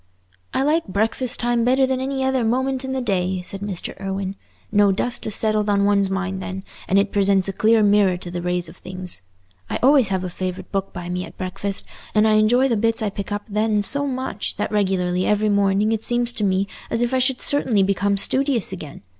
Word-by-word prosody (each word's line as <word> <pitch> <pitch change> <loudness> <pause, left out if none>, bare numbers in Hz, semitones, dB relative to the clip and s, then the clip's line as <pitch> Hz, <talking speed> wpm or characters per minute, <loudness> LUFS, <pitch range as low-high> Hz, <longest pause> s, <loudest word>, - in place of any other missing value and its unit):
"I 265 - 0
like 310 +1 +1
breakfast 225 +5 -1
time 240 -1 +1
better 260 +2 +3
than 260 0 -1
any 265 0 -2
other 265 -2 +1
moment 260 +3 0
in 265 - -4
the 265 0 -1
day," 185 -4 -1
said 195 +2 -5
Mr. 200 -4 -4
Irwine. 195 0 -3 0.4
"No 205 -1 +4
dust 240 +5 -2
has 215 - 0
settled 215 -1 +1
on 200 -1 +3
one's 200 -1 +3
mind 190 0 -2
then, 190 0 -5 0.2
and 195 - +2
it 200 0 +2
presents 195 -1 +3
a 195 - -2
clear 220 +2 +3
mirror 200 -3 +4
to 175 -1 -8
the 175 0 -4
rays 180 0 -1
of - - -13
things. 185 - -2 0.5
I - - -1
always 270 -3 +5
have 190 -1 -1
a 185 - -3
favourite 185 0 -5
book 195 -1 -2
by 175 - -7
me 180 +1 -3
at - - -12
breakfast, 190 +2 -4 0.3
and 215 +1 +5
I 215 - +4
enjoy 240 +5 +4
the 235 -4 +1
bits 225 +1 +1
I 210 - -1
pick 200 0 -6
up 205 0 -2
then 210 0 +1
so 285 +7 +3
much, 260 -5 -3
that 210 - -3
regularly 185 -3 0
every 210 0 +2
morning 200 +1 +2
it 220 -1 0
seems 240 0 0
to 215 - -3
me 190 0 +2 0.2
as 230 - +1
if 240 +2 -1
I 260 - +3
should 260 0 +2
certainly 250 -8 +2
become 200 +1 +1
studious 260 -1 +1
again. 155 - -9
205 Hz, 220 wpm, -22 LUFS, 190-240 Hz, 0.5 s, always